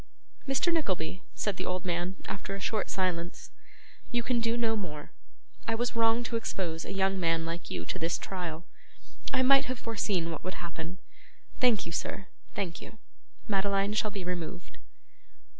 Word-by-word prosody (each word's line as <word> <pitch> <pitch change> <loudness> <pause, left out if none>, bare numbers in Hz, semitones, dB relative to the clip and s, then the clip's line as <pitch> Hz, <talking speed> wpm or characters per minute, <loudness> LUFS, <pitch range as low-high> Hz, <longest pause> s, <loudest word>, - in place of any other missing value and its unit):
'Mr. 270 +6 +3
Nickleby,' 185 - 0
said 205 -3 0
the 185 - -2
old 185 +1 -1
man, 175 +1 0
after 195 0 -3
a - - -5
short 215 +2 0
silence, 175 -2 -1 0.6
'you 240 -1 +2
can 245 0 +2
do 230 0 +2
no 225 -2 +3
more. 150 -8 -5 0.6
I 225 - +2
was 240 +1 0
wrong 230 +1 +4
to 235 -1 0
expose 170 -7 -2
a - - -4
young 195 0 +2
man 165 -1 +2
like 165 +1 -4
you 85 -2 -3
to - - -3
this 165 +1 +1
trial. 175 -3 -4 0.7
I 260 - +4
might 275 +1 +7
have 255 0 -2
foreseen 205 -7 0
what 160 - -5
would 185 - -3
happen. 170 0 -5 0.6
Thank 245 -5 +5
you, 165 - -5
sir, 190 +4 -2 0.3
thank 175 -4 -2
you. 220 - -10 0.5
Madeline 200 0 +2
shall 215 0 +2
be 200 -2 -4
removed. 180 0 -4
195 Hz, 170 wpm, -31 LUFS, 170-225 Hz, 0.7 s, might